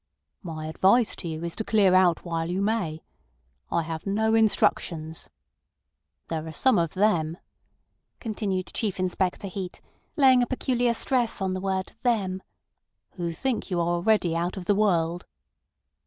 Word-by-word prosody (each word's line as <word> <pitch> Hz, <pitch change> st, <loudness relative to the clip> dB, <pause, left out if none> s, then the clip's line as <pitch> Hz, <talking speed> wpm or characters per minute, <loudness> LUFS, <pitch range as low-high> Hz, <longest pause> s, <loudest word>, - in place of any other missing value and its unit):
"My 160 Hz, -4 st, -6 dB
advice 195 Hz, +9 st, +3 dB
to 175 Hz, -, -5 dB
you 160 Hz, 0 st, -5 dB
is 170 Hz, 0 st, -4 dB
to 220 Hz, -, -1 dB
clear 205 Hz, -4 st, +3 dB
out 185 Hz, -2 st, +4 dB
while 165 Hz, -1 st, -2 dB
you 180 Hz, +2 st, -1 dB
may. 200 Hz, -7 st, -1 dB, 0.7 s
I 170 Hz, -, 0 dB
have 160 Hz, +2 st, -6 dB
no 220 Hz, +3 st, +1 dB
instructions. 170 Hz, -7 st, +1 dB, 1.0 s
There 160 Hz, -1 st, -4 dB
are -, -, -6 dB
some 235 Hz, -, +3 dB
of 165 Hz, +1 st, -1 dB
them," 175 Hz, -5 st, +1 dB, 0.8 s
continued 200 Hz, -5 st, -3 dB
Chief 205 Hz, -4 st, -2 dB
Inspector 185 Hz, +1 st, -1 dB
Heat, 185 Hz, -1 st, -6 dB, 0.4 s
laying 260 Hz, -3 st, +6 dB
a 245 Hz, -, +1 dB
peculiar 245 Hz, -2 st, 0 dB
stress 245 Hz, -3 st, +1 dB
on 190 Hz, -1 st, -1 dB
the 185 Hz, -, -3 dB
word 190 Hz, -1 st, -2 dB
"them," 195 Hz, -6 st, 0 dB, 0.7 s
"who 170 Hz, -3 st, -4 dB
think 240 Hz, +9 st, -2 dB
you 180 Hz, -2 st, -1 dB
are 170 Hz, 0 st, +1 dB
already 175 Hz, -1 st, +2 dB
out 175 Hz, +3 st, -2 dB
of 185 Hz, -, -6 dB
the 205 Hz, -, +3 dB
world." 175 Hz, -4 st, +1 dB
185 Hz, 155 wpm, -26 LUFS, 170-215 Hz, 1.0 s, laying